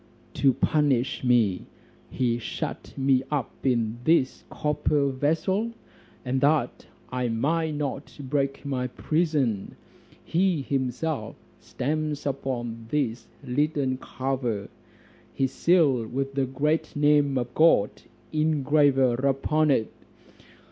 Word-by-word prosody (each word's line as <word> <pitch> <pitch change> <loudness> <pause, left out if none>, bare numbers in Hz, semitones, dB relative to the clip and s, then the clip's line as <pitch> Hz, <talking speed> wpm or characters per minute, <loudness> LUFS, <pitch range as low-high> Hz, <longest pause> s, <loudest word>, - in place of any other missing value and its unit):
To 135 - +4
punish 140 -2 +1
me, 115 -7 +2 0.4
he 120 -2 0
shut 115 - -5
me 135 -1 +3
up 145 -5 -1
in 120 -3 0
this 155 -4 +2
copper 150 -1 0
vessel; 165 - 0 0.5
and 130 +1 0
that 145 -4 +1 0.2
I 125 -1 -1
might 155 +7 0
not 145 -1 -4
break 140 0 -2
my 130 -2 -1
prison, 145 - -1 0.5
he 175 -4 +1
himself 130 -1 -2 0.2
stamps 150 +2 -3
upon 120 -5 -3
this 125 -5 -1 0.2
leaden 140 0 0
cover, 125 -6 -3 0.7
his 135 -1 0
seal 145 -11 +3
with 135 +3 -3
the 135 -1 0
great 150 +5 -1
name 145 -2 +3
of 120 -1 -3
God 155 -10 +4 0.4
engraver 145 -4 +3
upon 140 +4 +1
it. 115 -6 +1
135 Hz, 105 wpm, -26 LUFS, 125-150 Hz, 0.7 s, To